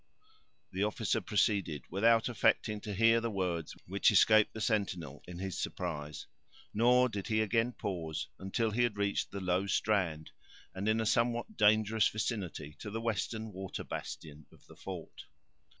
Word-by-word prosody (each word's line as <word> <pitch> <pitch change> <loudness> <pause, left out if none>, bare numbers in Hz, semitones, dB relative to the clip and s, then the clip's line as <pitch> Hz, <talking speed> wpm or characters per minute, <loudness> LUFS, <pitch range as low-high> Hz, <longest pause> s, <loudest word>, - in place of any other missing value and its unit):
The 95 - -3
officer 110 0 0
proceeded, 95 - 0
without 115 +4 +4
affecting 110 -3 +1
to 105 - -5
hear 115 +2 +5
the 115 - -1
words 90 -6 -2
which 100 +3 +3
escaped 110 +1 +5
the 110 - -8
sentinel 95 - -1
in 90 -1 -8
his 95 0 -4
surprise; 75 -4 -4 0.5
nor 125 +3 +5
did 105 -5 -5
he 110 -1 +1
again 115 +3 +1
pause 85 -7 -4
until 110 +4 -1
he 115 +4 0
had 120 -4 +1
reached 100 0 0
the 100 - -5
low 90 +1 0
strand, 90 -6 0 0.4
and 95 +3 -2
in 110 +1 +2
a - - -1
somewhat 120 - +1
dangerous 110 - +4
vicinity 100 -9 -3
to 105 - -6
the 110 +2 -4
western 110 -1 -2
water 95 0 -5
bastion 75 -1 -7
of - - -21
the - - -15
fort. - - -8
105 Hz, 160 wpm, -32 LUFS, 90-110 Hz, 0.5 s, hear